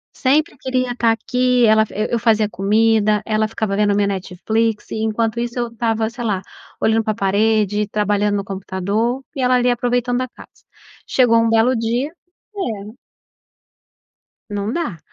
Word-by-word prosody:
Sempre 290 +5 +1
queria 255 -1 -1
tá 230 -2 +3
aqui. 250 +2 +1
Ela 220 0 +5
e 215 - -3
eu 235 - +2
fazia 220 -2 +2
comida, 215 +1 +2
ela 215 0 +1
ficava 215 -2 -2
vendo 205 -1 +2
minha 200 0 +2
Netflix, 210 +4 -2
e - - -4
enquanto 220 +1 -1
isso 235 +1 -3
eu 240 -1 -1
estava 225 -1 -1
sei 240 +1 -7
lá, 200 -4 -1 0.4
olhando 220 0 +2
pra 215 - 0
parede, 210 0 +1
trabalhando 205 0 +1
no 200 - -2
computador, 200 +6 -2
e - - -2
ela 255 0 +3
ali 250 0 +3
aproveitando 245 0 0
da 255 0 -2
casa. - - -15 0.6
Chegou 240 -3 +4
um 230 - +2
belo 225 +3 +3
dia 235 +5 -1 0.5
é. 215 - -4 1.6
Não 205 +1 -2
dá. 305 - -3
225 Hz, 160 wpm, -19 LUFS, 210-240 Hz, 1.6 s, Ela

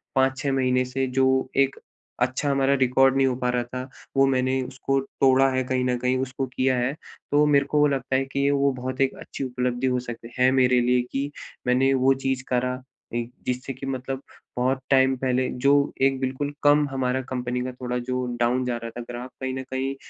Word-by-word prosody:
5-6 135 +1 +1
महीने 130 -1 +2
से, 130 +1 -2
जो 130 0 +2
एक 135 0 +2 0.4
अच्छा 130 +3 0
हमारा 135 0 +2
रिकॉर्ड 135 0 +3
नहीं 135 0 +3
हो 125 - 0
पा 125 -1 -1
रहा 125 0 0
था, 125 +2 -7 0.3
वो 135 - +6
मैंने 130 0 +1
उसको 135 +1 -1
तोड़ा 135 0 +3
है 130 0 0
कहीं 130 0 -1
न 125 -1 +1
कहीं, 125 +1 0
उसको 130 +1 -2
किया 130 0 0
है। 125 +3 0 0.4
तो 145 +1 +4
मेरे 140 -1 +4
को 150 +1 0
वो 150 - +5
लगता 135 -1 -1
है 135 +1 +1
कि 140 +1 0
वो 140 0 +2
बहुत 130 +1 -4
एक 135 - +2
अच्छी - - -6
उपलब्धि 125 0 -1
हो 125 -1 +1
सक 120 -2 -6 0.2
है 125 +1 +6
मेरे 125 -1 +4
लिए 125 +1 +3
कि 140 +1 -2 0.4
मैंने 135 +2 +3
वो 130 +1 +4
चीज़ 130 -1 0
करा 125 0 0 0.4
अ, - - -3 0.3
जिससे 125 +2 -3
की 130 +2 -8
मतलब 130 0 -4 0.4
बहुत 130 +2 +1
टाइम 130 -1 +4
पहले 130 0 0 0.2
जो 140 - +6 0.3
एक 135 -1 +3
बिल्कुल 135 +2 -2
कम 145 0 +5
हमारा 130 -1 0
कंपनी 125 -1 -2
का 130 - -3
थोड़ा 125 0 -4
जो 125 0 -1
डाउन 125 +2 +1
जा 120 -1 -1
रहा 115 0 -6
था - - -4
ग्राफ 125 +2 -6
कहीं 130 0 -2
न 130 - -4
कहीं 135 +1 -2
130 Hz, 210 wpm, -24 LUFS, 125-135 Hz, 0.4 s, वो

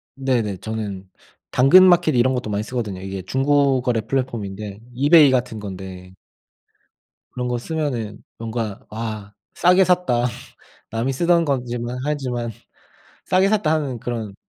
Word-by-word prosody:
네네. 120 -8 -1
저는 100 -4 -5 0.4
당근마켓 175 +3 +6
이런 130 +2 +3
것도 125 -4 -3
많이 105 +1 -1
쓰거든요. 110 -6 -4
이게 95 0 -5
중고 135 +4 +2
거래 120 -3 0
플랫폼인데 105 -5 -4
이베이 145 +2 +6
같은 125 -4 -1
건데 95 -2 -8 1.2
그런 125 0 -3
거 125 0 -1
쓰면은 120 -7 -3
뭔가 115 -2 -4
'와 110 -2 -6 0.2
싸게 180 +2 +5
샀다. 175 -10 +2 0.7
남이 115 +4 -1
쓰던 170 +3 +2
거지만 120 -3 -2
하지만 125 -6 -2 0.8
싸게 190 +1 +3
샀다.' 200 -7 +2
하는 140 -6 -1
그런 115 -4 -4
120 Hz, 280 characters per minute, -21 LUFS, 110-140 Hz, 1.2 s, 당근마켓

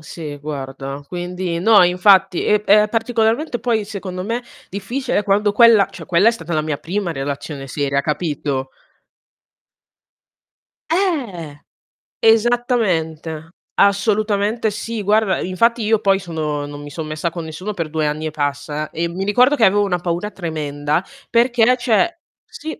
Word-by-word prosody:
sì, 155 -1 -8
guarda. 135 -1 -6
Quindi 180 0 -4
no, 215 +1 +6
infatti, 185 +1 +4
è 210 0 +3
p - - -21
è 210 +1 +5
particolarmente 230 +4 0
poi, 225 -3 0
secondo 190 -3 -6
me, 230 +4 -2 0.3
difficile 205 +4 -2
quando 205 +1 +2
quella 225 -2 +6
cioè, 195 - -10
quella 175 +4 +3
è - - +6
stata 175 -7 -7
la 155 - +2
mia 155 -1 -2
prima 180 +3 -3
relazione 140 0 -5
seria, 140 0 0
capito? 145 -3 -2 2.2
Eh, 240 - -1 0.6
esattamente. 210 - +1 0.3
Assolutamente 210 +2 +2
sì, 225 +1 -5
guarda, 210 0 +2
infatti 230 +6 +1
io 220 0 +2
poi 195 -1 +3
sono 155 -5 -3
non 145 0 -8
mi 145 - -9
son 155 +2 -6
messa 155 +2 -2
con 170 0 -6
nessuno 170 +6 -6
per 165 -5 -4
2 155 0 -1
anni 150 +1 -3
e 155 - -2
passa 145 +1 -3
e 170 +1 -2
mi 185 +3 -4
ricordo 250 +8 +4
che 225 - +5
avevo 205 +2 +3
una 195 -3 0
paura 175 +4 -3
tremenda 150 -2 -2 0.3
perché 240 0 +3
cioè 245 +8 +1 0.3
sì. 315 +1 -8
185 Hz, 145 wpm, -19 LUFS, 155-220 Hz, 2.2 s, no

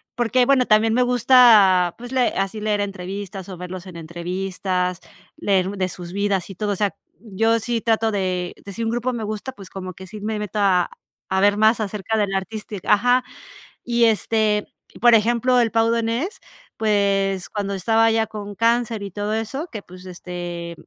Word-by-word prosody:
porque, 245 +1 +2
bueno, 265 -1 +4
también 220 0 +3
me 250 - +3
gusta, 230 -8 +5
pues, 245 +1 -9
le 255 -2 +3
así 195 +2 -3
leer 210 -1 0
entrevistas 195 0 -6
o 185 - -7
verlos 180 +1 -7
en 180 -3 -10
entrevistas, 180 +2 -3 0.4
leer 190 -2 +1
de 190 -2 -2
sus 175 0 -8
vidas 200 -2 -1
y 195 - -8
todo. 205 +3 -2
O - - -3
sea, 205 0 0 0.3
yo 225 +1 +1
sí 230 +1 -2
trato 225 0 +1
de 185 -3 -2
de 200 - -8
si 230 - -4
un 225 - 0
grupo 240 +2 -1
me 230 -2 -4
gusta, 215 +4 -4
pues, 195 -5 -12
como 185 -1 -7
que 190 +2 -11
sí 210 +4 -9
me 215 +1 -2
meto 210 0 -4
a 185 -3 +3 0.4
a 190 - +1
ver 205 0 +4
más 220 +2 +4
acerca 210 0 -2
del 205 -2 0
artista. 210 +2 -5
Ajá. 245 +4 +3 0.6
Y 235 -1 +2
este, 215 -1 +1 0.3
por 240 -1 +6
ejemplo, 240 +3 +3
el 230 -2 +2
Pau 225 0 +2
Donés, 235 - -1 0.4
pues, 195 -3 +1
cuando 200 -1 -3
estaba 225 +4 +3
ya 225 0 +1
con 205 -1 -7
cáncer 230 -1 +1
y 200 - -5
todo 205 +3 -3
eso, 225 +9 -3
que, 215 - -5
pues, 185 0 -14
este 175 -1 -6
210 Hz, 185 wpm, -22 LUFS, 190-225 Hz, 0.6 s, por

